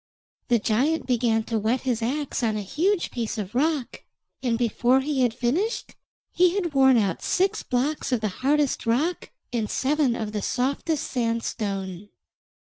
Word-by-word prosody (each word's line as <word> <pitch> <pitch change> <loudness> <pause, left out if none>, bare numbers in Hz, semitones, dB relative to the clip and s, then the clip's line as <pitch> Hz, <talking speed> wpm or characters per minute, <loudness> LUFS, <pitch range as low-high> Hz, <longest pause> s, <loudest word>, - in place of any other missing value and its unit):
The 240 - +4
giant 255 +9 +1
began 235 -3 +1
to 225 0 -1
whet 225 +5 0
his 245 -3 -1
axe 275 +5 -2
on 220 -3 0
a 210 - -3
huge 345 - 0
piece 235 -1 -3
of 205 -1 -5
rock, 290 0 -1 0.4
and 240 -3 0
before 245 +2 +2
he 280 -1 -1
had 245 -2 +3
finished 285 - -1 0.4
he 360 0 +3
had 350 -6 -1
worn 265 -2 +5
out 195 -6 0
six 380 +1 +1
blocks 270 +3 -1
of 250 - +2
the 215 - 0
hardest 285 -2 +1
rock 295 +10 0 0.2
and 225 -3 -1
seven 275 -2 +1
of 215 -2 -4
the 210 -1 -3
softest 280 +7 -1
sandstone. 205 -5 -2
245 Hz, 160 wpm, -25 LUFS, 225-290 Hz, 0.4 s, worn